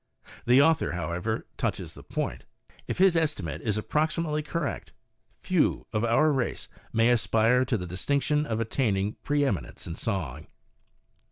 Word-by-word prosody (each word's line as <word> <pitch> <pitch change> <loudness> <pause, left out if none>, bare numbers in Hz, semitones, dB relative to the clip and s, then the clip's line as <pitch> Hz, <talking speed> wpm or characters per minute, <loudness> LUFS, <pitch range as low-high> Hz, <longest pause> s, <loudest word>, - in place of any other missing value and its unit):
The 125 +3 +7
author, 160 - +2
however, 90 +5 -2
touches - - -2
the - - -12
point. - - -4 0.4
If - - -3
his 185 -1 +5
estimate 100 - -1
is 110 -2 0
approximately 155 +5 0
correct, 150 - -4 0.5
few - - +1
of 105 - 0
our 120 +7 +4
race 130 -4 -2 0.2
may 115 +1 +4
aspire 115 +1 +3
to 125 - 0
the 90 - -5
distinction 140 - 0
of 110 -1 -1
attaining 105 -3 0
preeminence 140 - -1
in 85 - -5
song. 80 - -3
115 Hz, 140 wpm, -27 LUFS, 95-150 Hz, 0.5 s, The